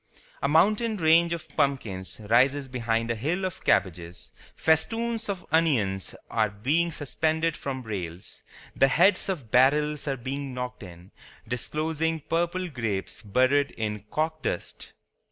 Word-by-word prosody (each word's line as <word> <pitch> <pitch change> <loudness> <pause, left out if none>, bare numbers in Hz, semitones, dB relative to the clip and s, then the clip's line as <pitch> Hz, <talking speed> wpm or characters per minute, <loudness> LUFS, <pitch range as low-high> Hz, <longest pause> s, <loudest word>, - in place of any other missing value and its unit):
A - - +1
mountain 210 +9 +3
range 165 0 +4
of 170 -2 -4
pumpkins 115 -12 -1
rises 135 +5 +3
behind 115 -2 -1
a - - -1
hill 165 - -1
of 185 - -5
cabbages. 90 -2 0 0.2
Festoons 225 +8 +1
of 190 -2 -4
onions 120 - +1
are 110 -2 +1
being 145 +12 0
suspended 160 +2 0
from 130 -2 -5
rails. 90 -5 -6 0.3
The 135 - +5
heads 185 +9 +3
of 140 - -4
barrels 150 +4 +3
are 135 -1 -1
being 135 +1 -5
knocked 125 0 -5
in, 90 -1 -12 0.4
disclosing 155 +6 -2
purple 175 +4 -1
grapes 115 - -4
buried 130 +7 +2
in 105 -2 -3
corkdust. 155 - -3
140 Hz, 130 wpm, -26 LUFS, 115-160 Hz, 0.4 s, The